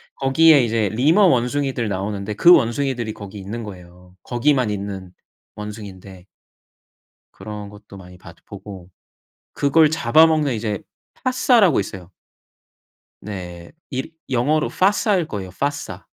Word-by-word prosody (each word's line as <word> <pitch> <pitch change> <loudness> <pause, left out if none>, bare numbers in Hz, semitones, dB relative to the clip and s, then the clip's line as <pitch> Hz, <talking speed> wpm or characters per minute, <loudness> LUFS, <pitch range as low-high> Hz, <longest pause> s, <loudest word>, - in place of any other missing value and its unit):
거기에 140 +1 +5
이제 110 -3 0
리머 150 - +3
원숭이들 130 -2 0
나오는데 100 +1 -3
그 170 +12 +6
원숭이들이 120 -4 0
거기 100 -1 -10
있는 105 +5 -6
거예요. 90 -2 -12
거기만 125 -1 +1
있는 100 -3 -5 0.4
원숭이인데 100 -3 -9 1.1
그런 105 -1 -8
것도 105 -1 -14
많이 90 -1 -13
봤 90 -2 -14
보고 95 -3 -11 0.6
그걸 155 +2 +3
잡아먹는 155 0 +3
이제 105 -3 -3 0.4
파사라고 245 - +3
있어요. 95 -2 -7 1.1
네 90 -4 -8 0.2
일 135 +3 -4 0.2
영어로 145 +5 +1
빠사일 195 -2 +1
거에요 100 -8 -6
빠사. 140 - -4
110 Hz, 280 characters per minute, -21 LUFS, 100-145 Hz, 1.1 s, 그